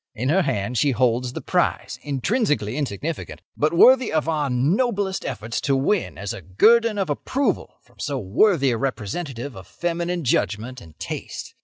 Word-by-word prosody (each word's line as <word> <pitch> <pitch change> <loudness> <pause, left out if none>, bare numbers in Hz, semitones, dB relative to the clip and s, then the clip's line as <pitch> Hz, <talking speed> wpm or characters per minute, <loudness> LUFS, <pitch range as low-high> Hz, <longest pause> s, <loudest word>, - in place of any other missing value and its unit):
In 125 +3 -1
her 190 +5 +4
hand 105 - -1
she 145 - +3
holds 125 +1 +1
the - - -5
prize, - - -1
intrinsically 145 - 0
insignificant, 145 +3 -4 0.2
but 150 +1 +1
worthy 250 +8 +6
of 155 0 0
our 150 -3 0
noblest 190 - 0
efforts 115 +2 -4
to 140 - +1
win 165 +9 0
as 100 0 -4
a - - -8
guerdon 220 - +4
of 195 -2 0
approval 245 - -1
from - - -27
so 145 -2 -2
worthy 135 - +3
a 115 - 0
representative 130 - -4
of 95 -1 -11
feminine 175 +2 -2
judgment 120 0 -1
and 80 -2 -15
taste. - - -6
140 Hz, 165 wpm, -23 LUFS, 120-180 Hz, 0.2 s, worthy